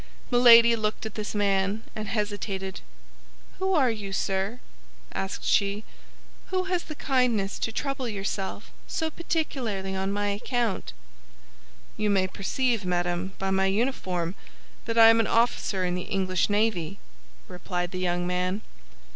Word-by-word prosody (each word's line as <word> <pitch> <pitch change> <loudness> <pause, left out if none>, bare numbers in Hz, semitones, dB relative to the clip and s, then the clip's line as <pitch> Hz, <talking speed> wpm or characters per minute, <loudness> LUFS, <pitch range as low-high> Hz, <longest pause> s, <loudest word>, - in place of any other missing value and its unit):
Milady 235 -1 +8
looked 215 0 -2
at 220 - -5
this 215 0 -4
man, 200 +1 +1
and 215 0 -4
hesitated. 205 -3 -3 0.8
"Who 380 0 +1
are 265 -6 +4
you, 205 -3 -5
sir," 195 +5 -1 0.5
asked 195 0 -4
she, 200 +1 +2 0.6
"who 370 -1 0
has 365 -2 -1
the 310 - -7
kindness 245 -9 +1
to 225 - -1
trouble 275 +1 -2
yourself 195 -2 -4 0.2
so 320 0 -2
particularly 245 - -2
on 190 +1 -1
my 205 0 0
account?" 210 - -2 1.0
"You 210 -1 +1
may 195 -2 +3
perceive, 225 +4 -1
madame, 175 +1 -1
by 195 0 -1
my 190 0 +3
uniform, 190 -6 -1 0.5
that 230 -1 -2
I 225 0 +9
am 225 - +3
an 225 - +2
officer 225 -5 +1
in 180 - 0
the 180 0 -4
English 185 -1 +1
navy," 205 -4 0 0.5
replied 180 0 -4
the 185 - -4
young 175 -1 0
man. 180 +3 -1
205 Hz, 140 wpm, -27 LUFS, 190-230 Hz, 1.0 s, I